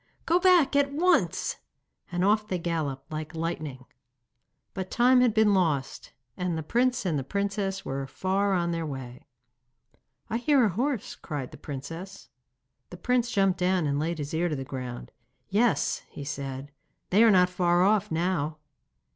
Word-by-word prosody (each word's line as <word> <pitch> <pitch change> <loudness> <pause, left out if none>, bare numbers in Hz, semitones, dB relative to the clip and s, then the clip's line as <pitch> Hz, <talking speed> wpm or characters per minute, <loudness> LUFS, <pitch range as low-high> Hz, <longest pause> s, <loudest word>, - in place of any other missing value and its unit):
Go 345 +2 +3
back 360 -6 +4
at 280 0 +3
once!' 355 +5 +1 0.5
and 175 +1 0
off 210 +1 +2
they 185 - -1
galloped 160 -5 -3
like 155 +1 -5
lightning. 155 -6 -4 0.9
But 190 -1 -5
time 250 +1 +4
had 250 -2 +4
been 215 -1 +4
lost, 155 -8 0 0.2
and 180 -2 -2
the 160 - -3
prince 245 +5 +1
and 145 -7 -1
princess 200 -1 -2
were 135 0 -3
far 195 +7 0
on 170 -2 +1
their 165 -1 -2
way. 130 -5 -7 1.0
'I 225 - -1
hear 265 0 +4
a - - +2
horse,' 245 - -2
cried 145 -5 -6
the - - -11
princess. 165 +8 -8 0.6
The 180 - -9
prince 245 +5 +1
jumped 195 -4 +2
down 180 -2 +2
and 140 0 0
laid 165 +2 -1
his 145 +1 -5
ear 170 +2 +1
to 155 - -2
the 135 - -4
ground. 125 -2 -7 0.4
'Yes,' 215 -5 +1
he 145 - -8
said, 140 -1 -5 0.4
'they 205 +5 +6
are 230 - +7
not 180 -3 +5
far 175 -1 +2
off 210 +1 +2
now. 160 -3 -1
180 Hz, 165 wpm, -27 LUFS, 150-210 Hz, 1.0 s, are